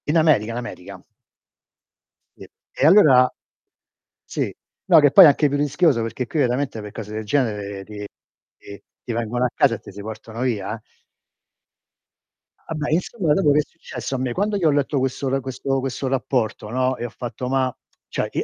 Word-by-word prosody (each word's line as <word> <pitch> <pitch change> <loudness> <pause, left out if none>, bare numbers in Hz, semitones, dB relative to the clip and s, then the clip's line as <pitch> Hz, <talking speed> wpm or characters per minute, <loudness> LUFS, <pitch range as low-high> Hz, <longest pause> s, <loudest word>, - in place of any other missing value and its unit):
In 150 +3 +2
America, 145 -9 +3
in 115 - -4
America. 120 -7 -8 1.3
Sì. - - -13 0.2
E - - 0
allora 145 -8 +6 1.0
sì. - - -3 0.3
No, 170 -4 +7
che 145 -2 +5
poi 190 - +10
è - - +10
anche 145 +1 +4
più 145 - -1
rischioso, 145 -2 +2
perché 115 +2 -4
qui 155 - -2
veramente 125 -3 0
per 105 -1 -8
cose 105 0 -8
del 110 0 -4
genere 105 -5 -1
ti 105 0 -8 0.5
ti 100 -1 -12 0.2
ti 120 - -4
vengono 120 +2 -1
a - - +1
casa 115 - +3
e - - -10
ti - - -12
si 100 +1 -9
portano 110 +2 -8
via, 110 -5 -1
eh. 110 - -13 1.9
Ah, - - -4
beh, 150 -1 -3
insomma, 175 -1 0
dopo 150 -3 +3
che 145 - +4
è - - +4
successo 165 -4 -7
a - - -1
me? 130 -1 -2
Quando 205 - -1
io 175 -5 +2
ho - - +3
letto 145 0 0
questo 135 +1 -2
l 135 +1 0
questo 135 +1 -2
questo 135 0 -3
rapporto, 125 -5 -1
no, 130 +2 0
e 120 - -4
ho - - -5
fatto: 120 +1 -6
"Ma" 130 -1 0 0.3
cioè, - - -3
i - - -8
130 Hz, 190 wpm, -22 LUFS, 115-145 Hz, 1.9 s, poi